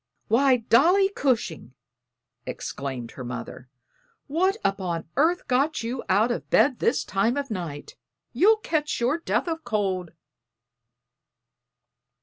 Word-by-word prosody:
"Why, 260 Hz, +2 st, +4 dB
Dolly 335 Hz, -, +4 dB
Cushing!" 230 Hz, -, -2 dB, 0.7 s
exclaimed 130 Hz, -4 st, -5 dB
her 130 Hz, -, -8 dB
mother. 125 Hz, +1 st, -7 dB, 0.6 s
"What 370 Hz, +8 st, +1 dB
upon 180 Hz, -5 st, -1 dB
earth 335 Hz, +6 st, +2 dB
got 275 Hz, +3 st, +1 dB
you 240 Hz, +2 st, -4 dB
out 210 Hz, +6 st, +3 dB
of 235 Hz, -, -4 dB
bed 275 Hz, -4 st, +3 dB
this 255 Hz, -, +1 dB
time 215 Hz, +7 st, 0 dB
of 280 Hz, -3 st, -3 dB
night? 165 Hz, -7 st, -6 dB, 0.4 s
You'll 405 Hz, -, +5 dB
catch 310 Hz, -7 st, -2 dB
your 250 Hz, +7 st, +1 dB
death 335 Hz, -, -1 dB
o' 325 Hz, -1 st, -1 dB
cold." 200 Hz, -, -2 dB
240 Hz, 120 wpm, -25 LUFS, 185-305 Hz, 0.7 s, You'll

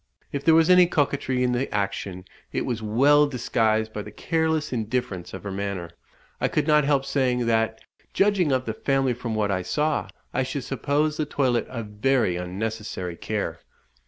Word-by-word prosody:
If 140 Hz, -1 st, -3 dB
there 160 Hz, -1 st, +5 dB
was 165 Hz, +2 st, +5 dB
any 180 Hz, -1 st, +7 dB
coquetry 140 Hz, -5 st, 0 dB
in 125 Hz, -, +2 dB
the 125 Hz, +2 st, -1 dB
action, 100 Hz, -2 st, -3 dB, 0.3 s
it -, -, -1 dB
was 120 Hz, -3 st, -2 dB
well 140 Hz, +7 st, +4 dB
disguised 110 Hz, -4 st, 0 dB
by 105 Hz, -, -3 dB
the -, -, -8 dB
careless 160 Hz, -3 st, -1 dB
indifference 110 Hz, -5 st, -2 dB
of 95 Hz, -, -8 dB
her 100 Hz, -, -4 dB
manner. 95 Hz, -3 st, -4 dB, 0.5 s
I -, -, +3 dB
could 150 Hz, -, 0 dB
not 150 Hz, -2 st, +4 dB
help 140 Hz, -2 st, +2 dB
saying, 130 Hz, -3 st, +1 dB
"that, 110 Hz, -1 st, +1 dB, 0.3 s
judging 195 Hz, -6 st, +2 dB
of 130 Hz, -1 st, +1 dB
the 110 Hz, -, -2 dB
family 135 Hz, +1 st, +1 dB
from 115 Hz, -2 st, -4 dB
what 105 Hz, -2 st, +1 dB
I 95 Hz, -1 st, 0 dB
saw, 150 Hz, -, 0 dB, 0.3 s
I 130 Hz, -, +1 dB
should 130 Hz, +1 st, -3 dB
suppose 145 Hz, +4 st, 0 dB
the 155 Hz, -, -1 dB
toilette 130 Hz, -5 st, +1 dB
a 115 Hz, -3 st, -4 dB
very 105 Hz, -1 st, +1 dB
unnecessary 95 Hz, 0 st, -4 dB
care." -, -, -3 dB
125 Hz, 180 wpm, -25 LUFS, 110-145 Hz, 0.5 s, any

